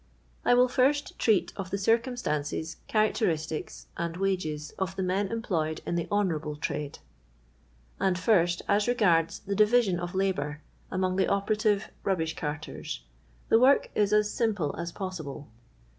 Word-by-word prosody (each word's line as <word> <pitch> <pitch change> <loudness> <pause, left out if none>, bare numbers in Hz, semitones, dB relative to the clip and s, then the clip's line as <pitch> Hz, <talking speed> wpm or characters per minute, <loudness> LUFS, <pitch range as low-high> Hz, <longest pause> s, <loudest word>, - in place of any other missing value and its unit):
I 245 - +5
will 250 +1 +5
first 275 +3 +1
treat 215 -5 +2
of 190 -2 -5
the 200 - -1
circumstances, 200 - -1
charac 215 -1 +3
teristics, 160 -6 -2
and 170 0 -3
wages 180 -6 -2
of 190 0 -2
the 190 - -2
m^n 190 +2 0
employed 165 -9 -2
in - - -2
the 170 -1 -1
honourable 160 -7 0
trade. 150 -1 -4 1.0
And 185 -2 +2
first, 175 -3 +2
as 205 +1 +2
regards 180 -9 +2
the 200 0 -3
divmon 210 -3 +3
of 175 +1 -5
labour 155 -6 -1 0.3
among 185 0 0
the 190 - +3
operative 205 +1 +1
rubbish 165 -5 0
carters, 150 - -5 0.5
the 225 - +6
work 265 +3 +4
is 205 -1 +2
as 210 0 +3
simple 205 -11 0
as 170 +1 -4
possible. 160 - -6
190 Hz, 145 wpm, -28 LUFS, 165-210 Hz, 1.0 s, the